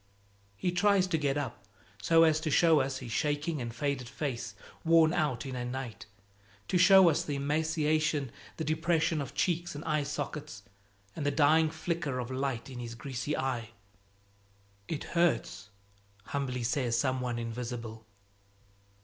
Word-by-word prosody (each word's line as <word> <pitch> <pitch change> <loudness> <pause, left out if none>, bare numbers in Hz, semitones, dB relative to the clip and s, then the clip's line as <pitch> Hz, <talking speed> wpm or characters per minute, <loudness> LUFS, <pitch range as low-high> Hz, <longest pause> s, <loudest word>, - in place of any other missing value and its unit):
He 180 - 0
tries 195 +1 +3
to 180 -3 0
get 140 -1 0
up, 135 -7 -4 0.4
so 165 +7 +5
as 155 -1 +4
to 160 0 -2
show 160 +1 +5
us 130 0 -1
his 125 -3 -8
shaking 150 +3 -1
and 120 -1 -4
faded 130 0 -2
face, 120 -6 -4 0.3
worn 165 0 +5
out 145 -9 0
in 130 -1 -5
a 125 - -3
night, 125 -4 -6 0.6
to 180 - +2
show 190 0 +8
us 165 +1 +2
the 145 -4 -3
emaciation, 155 -1 0 0.3
the 160 - -2
depression 160 0 +1
of 135 - -7
cheeks 175 -2 0
and 145 - -7
eye 155 -2 +1
sockets, 145 - -5 0.5
and 155 - -4
the 145 - +2
dying 155 +2 +4
flicker 155 -4 -3
of 125 0 -4
light 130 -3 -2
in 130 -2 -8
his 120 -1 -6
greasy 135 +3 -3
eye. 125 -4 -2 1.2
"It 155 - -3
hurts!" 170 - +1 0.5
humbly 125 -2 -3
says 120 -1 0
some 130 +1 0
one 120 -2 -2
invisible. 115 -1 -5
145 Hz, 155 wpm, -30 LUFS, 125-160 Hz, 1.2 s, show